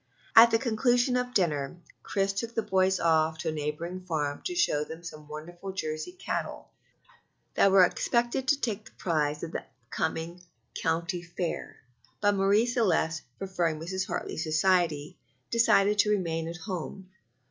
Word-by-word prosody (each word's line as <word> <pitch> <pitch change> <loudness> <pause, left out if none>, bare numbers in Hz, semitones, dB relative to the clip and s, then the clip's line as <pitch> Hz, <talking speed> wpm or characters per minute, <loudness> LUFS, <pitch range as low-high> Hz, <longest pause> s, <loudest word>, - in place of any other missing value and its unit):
At 230 +1 +10
the 225 - +3
conclusion 245 +2 +2
of 250 0 -1
dinner 150 -5 0 0.2
Chris 195 0 0
took 230 +4 -4
the 225 - +1
boys 190 -1 +2
off 160 -1 +2
to 160 +1 -2
a - - -1
neighboring 155 +4 -4
farm 150 -5 -2
to 360 - -2
show 150 - +2
them 160 +2 -9
some 155 -3 -9
wonderful 175 +5 -8
Jersey 155 - -4
cattle 370 - -4 0.8
that 195 - +4
were 190 -1 +8
expected 240 +7 0
to 285 +2 +3
take 220 -5 -2
the - - -14
prize 150 -3 -1
at 165 - -5
a - - -3 0.3
coming 165 +2 -3 0.3
county 170 +2 -1
fair; 175 0 -4 0.4
but 205 0 +3
Marie 200 +3 +3
Celeste, 185 -9 +1 0.2
preferring 175 -5 -1
Mrs. 190 +4 -3
Hartley's - - -3
society, 160 -2 +1 0.3
decided 210 -3 +4
to 210 - +5
remain 165 -5 0
at 170 +1 -5
home. 185 +1 -6
180 Hz, 155 wpm, -28 LUFS, 160-210 Hz, 0.8 s, At